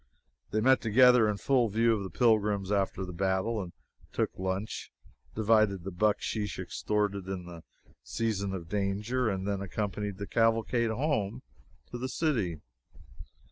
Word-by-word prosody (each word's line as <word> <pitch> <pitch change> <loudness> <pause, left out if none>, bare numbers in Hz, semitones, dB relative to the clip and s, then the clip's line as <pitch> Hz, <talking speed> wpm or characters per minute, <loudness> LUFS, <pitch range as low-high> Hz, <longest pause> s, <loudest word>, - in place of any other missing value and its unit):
They 110 - 0
met 130 +3 +4
together 120 0 +5
in 105 - -1
full 125 0 +2
view 115 +3 +3
of 105 - -3
the 95 - -5
pilgrims, 105 0 +2
after 95 -1 0
the 90 - -7
battle, 95 +5 0
and 90 -2 -7 0.4
took - - 0
lunch, 95 +3 -4 0.4
divided 110 -4 +3
the 95 - -5
bucksheesh 105 +2 0
extorted 100 +1 -2
in 95 -2 -4
the 85 -1 -10 0.4
season 105 -4 -2
of 90 -4 -5
danger, 105 +5 -1
and 95 -1 -3
then 100 -1 -1
accompanied 100 0 -3
the 100 - -5
cavalcade 115 +1 +2
home 115 -2 -1 0.5
to 120 - -5
the 130 +1 -3
city! 110 - -1
105 Hz, 145 wpm, -30 LUFS, 95-115 Hz, 0.5 s, together